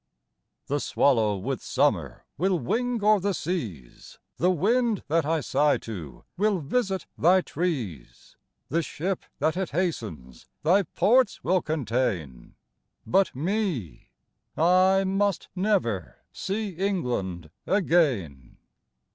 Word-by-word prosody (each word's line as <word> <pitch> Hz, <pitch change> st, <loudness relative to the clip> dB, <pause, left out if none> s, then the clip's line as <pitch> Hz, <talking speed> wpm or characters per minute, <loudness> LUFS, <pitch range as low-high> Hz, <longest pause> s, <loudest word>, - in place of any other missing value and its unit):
The 145 Hz, +1 st, -1 dB
swallow 110 Hz, -8 st, +2 dB
with 130 Hz, +7 st, -3 dB
summer 105 Hz, -, 0 dB
Will 185 Hz, +4 st, +1 dB
wing 235 Hz, -, -1 dB
o'er 210 Hz, 0 st, +5 dB
the 200 Hz, 0 st, -1 dB
seas, 110 Hz, -, -5 dB, 0.2 s
The 180 Hz, -, +2 dB
wind 215 Hz, +5 st, +1 dB
that 160 Hz, -1 st, +2 dB
I 160 Hz, -1 st, +1 dB
sigh 145 Hz, +2 st, +2 dB
to 90 Hz, -11 st, -8 dB
Will 205 Hz, +1 st, +2 dB
visit 190 Hz, -, -1 dB
thy 185 Hz, +4 st, +5 dB
trees. 130 Hz, -, -4 dB, 0.3 s
The 165 Hz, +5 st, +1 dB
ship 180 Hz, +4 st, -3 dB, 0.2 s
that 155 Hz, +3 st, +1 dB
it 190 Hz, 0 st, -2 dB
hastens 110 Hz, -, -4 dB, 0.2 s
Thy 180 Hz, +6 st, +5 dB
ports 230 Hz, -, +2 dB
will 185 Hz, +1 st, +2 dB
contain, 115 Hz, -, -2 dB, 0.5 s
But 190 Hz, -, +2 dB
me! 170 Hz, -, -2 dB, 0.5 s
I 185 Hz, +3 st, +4 dB
must 195 Hz, 0 st, 0 dB
never 180 Hz, -, 0 dB
See 205 Hz, +2 st, -3 dB
England 125 Hz, -, -2 dB, 0.2 s
again! 130 Hz, -, +1 dB
165 Hz, 115 wpm, -26 LUFS, 115-195 Hz, 0.5 s, o'er